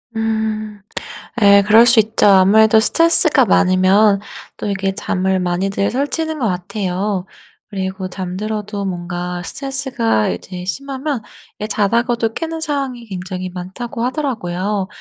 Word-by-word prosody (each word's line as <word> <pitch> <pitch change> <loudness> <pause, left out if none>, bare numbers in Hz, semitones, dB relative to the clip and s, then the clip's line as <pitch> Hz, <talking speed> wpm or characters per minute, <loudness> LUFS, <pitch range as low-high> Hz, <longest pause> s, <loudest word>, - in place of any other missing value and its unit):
음. 220 -1 -2 0.6
예 200 -1 +7
그럴 220 +3 +7
수 240 -1 +5
있죠. 220 0 +2
아무래도 210 +3 +6
스트레스가 320 +2 +4
많으면 195 +2 +4 0.4
또 - - -4
이게 195 -1 -1
잠을 190 0 -1
많이들 190 +3 -1
설치는 310 +4 -2
것 240 - 0
같아요. 185 0 -2 0.4
그리고 190 -2 -4
잠들어도 200 +3 -4
뭔가 175 -1 -4
스트레스가 260 - -1
이제 180 - -6
심하면 275 +4 -3 0.4
이 210 - -3
자다가도 230 +2 0
깨는 325 +2 -4
상황이 275 -6 -3
굉장히 185 -1 -5
많다고 190 +7 -6
하더라고요. 210 - -2
205 Hz, 295 characters per minute, -18 LUFS, 185-235 Hz, 0.6 s, 예